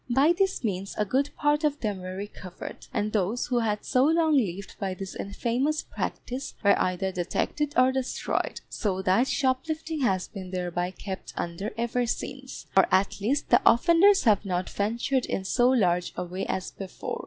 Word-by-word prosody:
By 275 +7 +4
this 385 -5 0
means 195 -3 -3
a 210 - +1
good 270 +7 +1
part 295 +1 +2
of 295 -1 +1
them 210 -4 -2
were 185 0 -6
recovered, 190 -2 -8
and 210 0 -1
those 215 +3 0
who 245 -2 +1
had 210 -2 -1
so 255 -1 +3
long 320 0 +3
lived 200 -7 -1
by 190 -2 -2
this 195 0 -7
infamous 245 +9 -1
practice 255 +3 -5
were 200 -1 +6
either 185 +1 0
detected 280 - -2
or 255 +1 +6
destroyed; 260 -1 -2
so 190 -4 -2
that 190 +8 +3
shoplifting 310 +5 -1
has 190 -9 +1
been 190 -3 -8
thereby 180 -1 -2
kept 190 0 -7
under 175 +5 -3
ever 235 +1 0
since, 260 +2 -5
or 190 - +6
at 190 +2 +2
least 260 +8 0
the 240 - +6
offenders 340 - +5
have 215 -5 +4
not 180 -2 -2
ventured 235 +5 0
in 190 - -2
so 245 +5 +3
large 180 -8 +2
a - - -2
way 180 +2 -4
as 185 - -3
before. 195 -2 -6
220 Hz, 175 wpm, -27 LUFS, 190-265 Hz, -, were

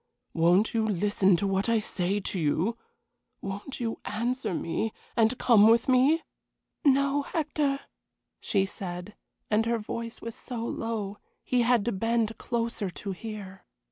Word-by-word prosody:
Won't 175 +6 +3
you 225 -1 +2
listen 195 -1 +3
to 170 - -1
what 195 +3 0
I 230 - +4
say 200 -2 -1
to 190 -1 -3
you? 165 +8 +1 0.6
Won't 200 +8 -6
you 230 -2 -2
answer 235 +1 -1
me, 180 +6 -1 0.2
and 230 +1 +3
come 220 -4 +6
with 230 +1 +4
me?" 270 +6 +4 0.6
"No, 280 0 +3
Hector," 290 -2 -1 0.6
she 195 -3 +1
said, 180 0 -6 0.4
and 220 +2 +3
her 235 0 +2
voice 230 +2 -5
was 230 - -6
so 235 -1 -5
low 215 -4 -3 0.2
he 250 -1 +2
had 240 -3 +3
to 240 - +1
bend 225 +2 0
closer 230 -4 -2
to 195 +3 -6
hear. 195 -2 -7
225 Hz, 145 wpm, -28 LUFS, 195-235 Hz, 0.6 s, come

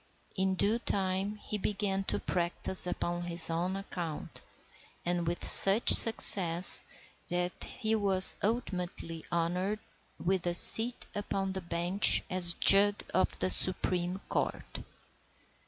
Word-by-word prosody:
In 190 0 -3
due 210 +5 -2
time 195 -1 -4
he 210 0 -9
began 195 -1 -4
to - - -3
practise 180 +1 0
upon 175 0 -6
his 170 -1 -1
own 175 +3 -5
account, 175 -5 -9 0.6
and 175 -1 -4
with 175 +1 -5
such 195 +4 +5
success 185 -6 +4 0.5
that 180 0 -5
he 220 0 -6
was 195 -3 +3
ultimately 180 -7 -6
honoured 180 +5 -4 0.4
with 180 0 -4
a 175 - 0
seat 230 +6 +5
upon 195 -2 -6
the 190 - -7
bench 175 +3 +1
as 175 -2 +2
judge 200 +1 +4
of 185 - -2
the 95 0 +1
Supreme 180 - 0
Court. - - -6
185 Hz, 120 wpm, -27 LUFS, 175-200 Hz, 0.6 s, such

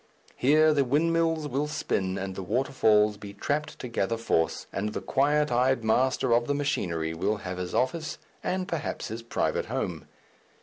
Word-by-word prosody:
Here 155 +4 +4
the 140 -2 +3
windmills 165 +3 +1
will 140 +2 -1
spin 95 -10 -1
and 95 0 -4
the 95 - -5
waterfalls 105 -1 +2
be 100 -1 -10
trapped 145 +8 -2
to - - -6
gather 115 -1 -1
force, 85 -8 0
and 105 +2 -2
the - - -2
quiet 150 +1 +2
eyed 125 0 +2
master 120 +2 +2
of 120 0 +2
the 145 - +1
machinery 85 - -1
will 105 +6 0
have 90 0 -4
his 90 -1 -4
office 145 +4 -1 0.3
and 185 0 -1
perhaps 170 -6 -3
his 110 +2 -5
private 115 - -1
home. - - -3
125 Hz, 170 wpm, -27 LUFS, 105-145 Hz, 0.3 s, Here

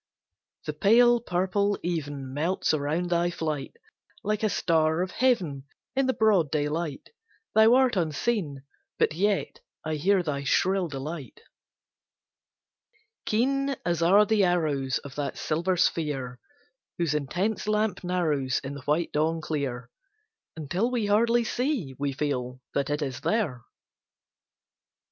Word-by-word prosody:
The 150 - -3
pale 240 +8 +5
purple 200 +1 0
even 145 -6 -3
Melts 160 +4 0
around 155 +4 -1
thy 175 0 +2
flight; 155 -5 -4 0.5
Like 210 +1 -1
a 215 - +2
star 160 -2 +2
of 185 - -5
heaven 180 - +1 0.3
In 270 0 +2
the 260 - +2
broad 205 -9 +3
daylight, 150 0 -2 0.4
Thou 220 +2 +6
art 260 -3 +3
unseen, 160 - -1 0.3
but - - +2
yet 200 +4 0 0.3
I 155 -1 -1
hear 190 +4 +2
thy 140 -3 -3
shrill 185 +5 +2
delight 145 0 -7 1.9
Keen 275 +5 +1
as 170 -1 0
are 195 +5 +6
the 210 -1 +2
arrows 155 -7 +1
Of 140 -2 -9
that 140 -2 -3
silver 170 +4 0
sphere 140 -8 -1 0.6
Whose 170 -4 0
intense 180 +9 -1
lamp 210 -3 0
narrows 155 -8 0
In 135 +1 -5
the 140 - -8
white 155 +3 0
dawn 160 +2 +1
clear, 140 -6 -4 0.6
Until 175 - -1
we 240 -4 -1
hardly 230 +3 +3
see, 240 - -1
we 140 0 0
feel, 130 -3 -3
that 140 0 0
it 150 +1 -1
is 130 -3 -4
there. 190 - 0
170 Hz, 130 wpm, -27 LUFS, 145-205 Hz, 1.9 s, Thou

